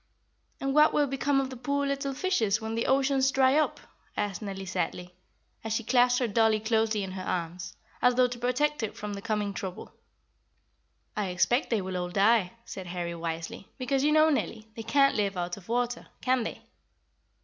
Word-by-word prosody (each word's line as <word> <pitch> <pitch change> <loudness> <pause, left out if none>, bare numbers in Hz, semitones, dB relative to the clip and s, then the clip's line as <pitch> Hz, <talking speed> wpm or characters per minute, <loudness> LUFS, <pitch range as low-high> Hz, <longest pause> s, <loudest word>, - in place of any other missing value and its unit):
"And 275 0 -1
what 300 +1 +6
will 295 - +4
become 275 +1 +1
of 265 -1 -2
the - - -6
poor 280 +3 -1
little 275 -1 -2
fishes 245 - +1
when 220 0 -4
the 230 +1 -1
oceans 270 0 +3
dry 265 0 +4
up?" 310 0 +1 0.4
asked 205 0 -2
Nellie 195 -2 -5
sadly, 180 0 -3 0.5
as 225 -1 -2
she 235 - -1
clasped 245 +1 +4
her 250 - +1
dollie 220 0 +3
closely 220 -1 +1
in 190 - -5
her 190 0 -5
arms, 175 -1 -4 0.3
as 250 0 +4
though 255 0 +5
to 245 -1 -7
protect 275 +5 +1
it 220 - -4
from 210 0 -5
the 200 - -6
coming 210 -1 -1
trouble. 185 -1 -6 1.2
"I 210 -2 -1
expect 185 +8 +1
they 220 -5 +1
will 185 0 -3
all 180 0 -2
die," 200 0 +3
said 190 -5 -7
Harry 175 -1 -3
wisely; 165 +2 -5
"because 270 +1 0
you 300 - +3
know, 310 +1 +5
Nellie, 225 -6 -2
they 225 - -5
can't 275 +4 +3
live 200 -3 0
out 175 0 -2
of 200 -1 -15
water. 245 +1 -1
Can 255 -1 +2
they?" - - -6
225 Hz, 195 wpm, -28 LUFS, 195-265 Hz, 1.2 s, what